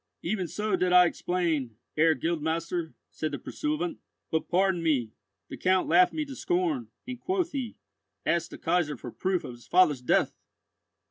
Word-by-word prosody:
"Even 185 0 -1
so 210 +5 -1
did 180 0 +1
I 180 0 +8
explain, 165 -10 -1 0.2
Herr 160 +1 +4
Guildmaster," 165 +2 -2 0.2
said 155 -2 -3
the - - -1
pursuivant; 155 +5 -3 0.3
"but, 160 - -1
pardon 185 -1 +2
me, 135 -9 +1 0.4
the - - -8
Count 185 0 +2
laughed 180 +2 +5
me 310 -1 -2
to 275 -2 -8
scorn, 345 -8 0 0.2
and 250 -1 -5
quoth 365 0 -1
he, 260 -5 -4 0.5
'asked 170 -1 +1
the - - -9
Kaisar 165 -4 0
for 120 - -8
proof 185 +5 -1
of - - -6
his 120 -2 -14
father's 170 -7 +4
death! 125 - +2
175 Hz, 165 wpm, -28 LUFS, 155-190 Hz, 0.5 s, I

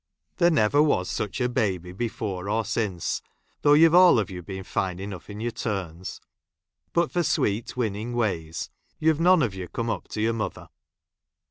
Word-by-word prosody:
There 175 -2 +5
never 145 -3 +3
was 95 -12 +2
such 105 - -3
a 125 - +2
baby 95 -8 -1
before 100 -2 -4
or 110 +1 0
since, 100 -5 -2 0.4
though 145 - +5
you've 160 +2 +6
all 180 -5 +8
of 105 -3 -1
you 90 -1 -6
been 95 +2 -7
fine 95 -1 -2
enough 95 -2 -7
in 105 0 -7
your 120 +2 -2
turns; 95 -6 -4 0.7
bitt 170 0 +1
for 175 - +1
sweet 115 -6 0
winning 110 0 -2
ways, 85 -9 -2 0.3
you've 160 -1 +2
none 180 -2 +5
of 110 -6 -1
you 95 -2 -6
come 115 +3 -2
up - - -4
to 105 - -4
your 115 +1 +2
mother. 110 -1 -4
110 Hz, 175 wpm, -26 LUFS, 95-130 Hz, 0.7 s, all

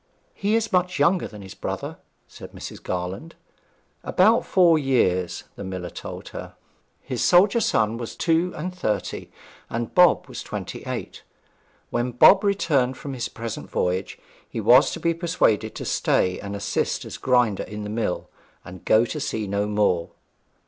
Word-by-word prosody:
'He 205 +2 0
is 225 -2 -1
much 180 0 +1
younger 170 +5 +2
than 105 -2 -11
his 95 - -10
brother?' - - -5 0.3
said - - -12
Mrs. - - -8
Garland. 90 - -5 0.7
About 220 +6 +3
four 175 -4 +5
years, 95 - +1
the - - -7
miller 95 -2 -5
told - - -8
her. - - -8 0.5
His - - -3
soldier 195 +6 +5
son 115 - +1
was 120 -1 -6
two 170 +1 +1
and 180 +4 -4
thirty, 105 - -3 0.4
and 115 0 -4
Bob 180 -2 +5
was - - -7
twenty - - -6
eight. - - -5 0.7
When 120 +1 -1
Bob 155 - +7
returned 145 -11 +1
from 140 - -6
his 120 -3 -3
present 115 -2 -6
voyage, 90 +2 -1 0.3
he - - -5
was 125 +6 +6
to - - -5
be 170 0 +1
persuaded 165 - 0
to - - -6
stay 90 0 +1
and 100 0 -6
assist 100 0 -2
as - - -7
grinder 125 -5 +2
in 105 0 -6
the 105 - -5
mill, 110 -5 -2 0.4
and 90 -1 -11
go 110 +2 +4
to 150 - -5
sea 110 -7 -2
no 100 +1 -1
more. 105 -5 +1
120 Hz, 165 wpm, -24 LUFS, 105-170 Hz, 0.7 s, Bob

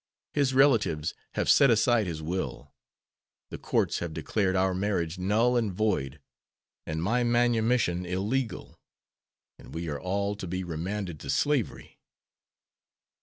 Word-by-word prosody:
His 140 -3 +1
relatives 115 - +3 0.2
have - - 0
set 140 - +6
aside 115 -1 +3
his 80 -2 -5
will. 90 +4 -4 0.8
The - - -6
courts - - 0
have 85 -2 -5
declared 95 +4 0
our 95 0 +2
marriage 90 -3 -1
null 110 +6 +2
and 115 -4 +1
void 90 -9 -1 0.7
and 80 +1 -2
my 120 +6 +1
manumission 120 -5 +2
illegal, 110 +7 -3 0.8
and - - -12
we 85 +1 -4
are 70 -1 -3
all 100 +2 -1
to 95 - -6
be 95 +2 -3
remanded 90 +1 -4
to - - -9
slavery." 145 -7 -1
100 Hz, 130 wpm, -28 LUFS, 85-120 Hz, 0.8 s, set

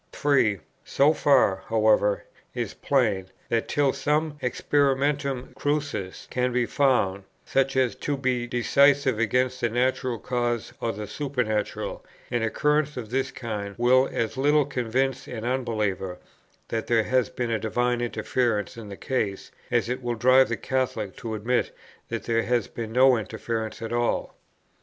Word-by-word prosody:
3. 135 -8 +2 0.3
So 145 +3 +3
far, 135 -11 +4
however, 110 -2 +3 0.3
is - - -3
plain, 110 -9 +1 0.2
that, 115 -1 0
till 145 -3 +2
some 150 +1 0
experimentum 140 0 0
crucis 145 -10 -3
can 125 0 0
be 125 0 +1
found, 115 -9 +1 0.2
such 135 0 +1
as 130 -3 +2
to 145 -1 -2
be 125 -2 -1
decisive 135 +1 +3
against 125 +3 +1
the 120 - +1
natural 125 +1 0
cause 120 0 -2
or 115 - 0
the 105 0 -6
supernatural, 120 -2 -2 0.3
an 120 -1 0
occurrence 150 +6 +1
of 115 -3 -6
this 135 +1 0
kind 105 -4 -5
will 130 +2 +4
as 115 +2 -2
little 145 +2 +3
convince 130 0 -1
an 115 -2 -6
unbeliever 105 -8 -1 0.5
that 115 -1 -2
there 115 -2 +3
has 125 -1 +1
been 120 -2 -3
a 115 - 0
divine 120 +2 0
interference 120 -3 -1
in 110 -3 -8
the 100 - -8
case, 105 -7 -2 0.2
as 120 -2 +1
it 125 +2 -3
will 120 -1 -2
drive 130 +3 +5
the 115 - -1
Catholic 120 -7 -2
to 115 -2 -4
admit 120 +4 0 0.4
that - - -3
there 115 0 +1
has 120 -2 0
been 115 -2 -6
no 130 +1 +5
interference 110 0 -4
at 115 - -4
all. 120 0 0
120 Hz, 150 wpm, -25 LUFS, 110-130 Hz, 0.5 s, drive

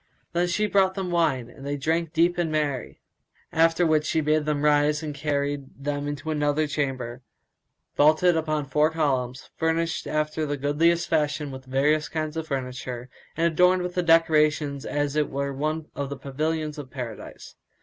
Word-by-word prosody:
Then 175 +1 +2
she 195 +5 +1
brought 190 -2 +2
them 190 -2 -3
wine, 150 -8 +1
and 135 - -14
they 145 +1 -2
drank 160 +3 0
deep 175 +2 +2
and 165 -2 0
made 155 - +1
merry; 140 -4 -3 0.5
after 165 +2 +3
which 155 -1 +3
she 160 - +1
bade 155 0 +1
them 150 -1 -1
rise 150 +1 +3
and 150 -1 -4
carried 145 -1 -2
them 145 +1 -3
into 145 +2 -4
another 150 0 +1
chamber, 130 -4 -3 0.7
vaulted 155 +4 +4
upon 155 -2 -1
four 150 +3 +2
columns, 130 -5 -1
furnished 165 +1 0
after 155 +1 -1
the 145 -1 -2
goodliest 165 +5 +2
fashion 150 -2 0
with 130 0 -9
various 145 +4 +1
kinds 155 -1 -3
of 160 0 -4
furniture, 125 -2 -5 0.3
and 165 - +2
adorned 180 +2 +4
with 180 0 -4
decorations 150 -3 +3
as 145 0 -1
it 150 -1 +1
were 140 0 -2
one 155 +3 -2
of 140 -1 -4
the 140 - -5
pavilions 150 +3 -2
of 140 -3 -8
Paradise. 120 -4 -8
150 Hz, 170 wpm, -25 LUFS, 140-160 Hz, 0.7 s, vaulted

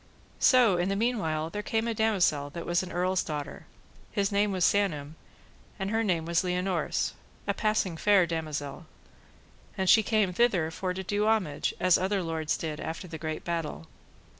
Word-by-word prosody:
So 240 -8 +5
in 175 +2 0
the 195 - 0
meanwhile 165 -9 -1
there 210 - -3
came 225 +2 -1
a 230 - 0
damosel 190 -10 +1
that 170 - -6
was 175 0 +1
an 185 - -7
earl's 185 +1 +1
daughter: 150 -2 -6 0.4
his 200 -1 0
name 205 +1 +2
was 185 -2 +2
Sanam, 155 -8 +1 0.6
and 195 +1 -3
her 225 0 +1
name 175 -6 0
was 170 0 +2
Lionors, 180 -1 -1 0.3
a - - 0
passing 215 -6 0
fair 200 0 +4
damosel; 155 -4 -4 0.9
and 190 - -1
so - - +8
she 220 - +6
came 215 -4 +1
thither 180 -7 +2
for 180 +2 -3
to 190 - -4
do 205 +3 0
homage, 195 -10 0
as 185 -1 +4
other 190 0 0
lords 160 -2 -1
did 155 -2 -4
after 165 +3 -5
the 160 -2 -7
great 155 0 -4
battle. 165 - -3
180 Hz, 180 wpm, -28 LUFS, 160-205 Hz, 0.9 s, so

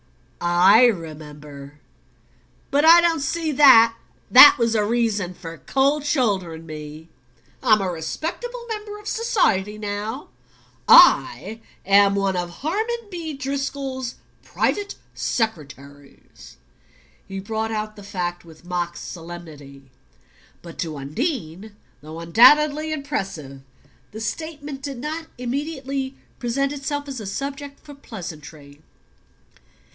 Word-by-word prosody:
I 185 +7 +6
remember. 150 -6 -7 0.9
But 285 +1 +2
I 335 +2 +8
don't 335 -2 +1
see 320 +2 -2
that 245 -5 +7 0.4
that 265 +3 +10
was 230 -1 +1
a 215 -2 +2
reason 210 -5 -1
for 165 -2 -10
cold 275 - +1
shouldering 195 - -1
me. 155 0 -9 0.5
I'm 215 -2 +4
a 190 -2 -2
respectable 335 - -5
member 420 -2 -6
of 420 0 -12
society 215 - 0
now 210 +5 -5 0.6
I'm 225 +1 +5 0.5
one 195 -1 0
of 175 -1 -3
Harmon 430 - -3
B. 330 -3 -5
Driscoll's 270 -2 -4 0.3
private 410 -1 -2 0.2
secretaries." 145 - -6 0.7
He 195 0 -6
brought 220 +3 -3
out 215 -1 -4
the 205 - -12
fact 180 -3 -4
with 165 0 -17
mock 175 -1 -3
solemnity. 155 -6 -10 0.7
But 170 -1 -12
to 160 -3 -4
Undine, 205 - -4 0.3
though 155 +2 -9
undoubtedly 295 - +4
impressive, 195 - -5 0.5
the 220 - -8
statement 290 +3 -6
did 275 -1 -6
not 315 +5 -5
immediately 270 +1 -4 0.2
present 275 +4 -1
itself 285 +1 -4
as 270 -3 -6
a 210 - -7
subject 280 +6 -6
for 290 - -13
pleasantry. 155 - -10
220 Hz, 110 wpm, -22 LUFS, 170-285 Hz, 0.9 s, that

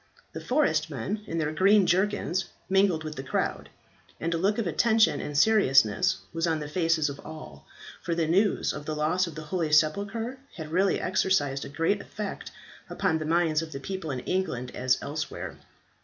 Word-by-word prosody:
The - - -6
forest - - +1
men 210 0 -4
in 165 - -3
their 155 -2 0
green 195 +5 +4
jerkins 190 -1 +1 0.2
mingled 190 -4 +2
with 155 -1 -5
the - - -3
crowd, 135 - -2 0.5
and 165 +1 -1
a - - 0
look 200 +4 +1
of 230 - -1
attention 220 +6 +3
and 145 -1 -4
seriousness 135 - +4 0.2
was 165 +1 0
on 160 -1 +1
the 150 - -5
faces 165 -1 +1
of 140 0 -6
all, 155 0 -10 0.3
for 170 - -2
the 165 -1 +1
news 195 +5 +2
of 145 - -8
the 155 - -2
loss 165 +5 +1
of 165 - -8
the 155 - -6
holy 160 0 -2
sepulchre 205 - +1 0.2
had 155 -3 -7
really 190 +3 +2
exercised 180 -7 +1
a - - -8
great 165 +8 0
effect 210 0 -6 0.4
upon 160 - 0
the 155 - -4
minds 165 -1 +2
of 160 -1 -7
the 135 - -5
people 185 +2 -5
in 130 -3 -3
England 125 -10 -2
as 130 0 +1
elsewhere. 155 +2 -5
165 Hz, 185 wpm, -27 LUFS, 150-190 Hz, 0.5 s, green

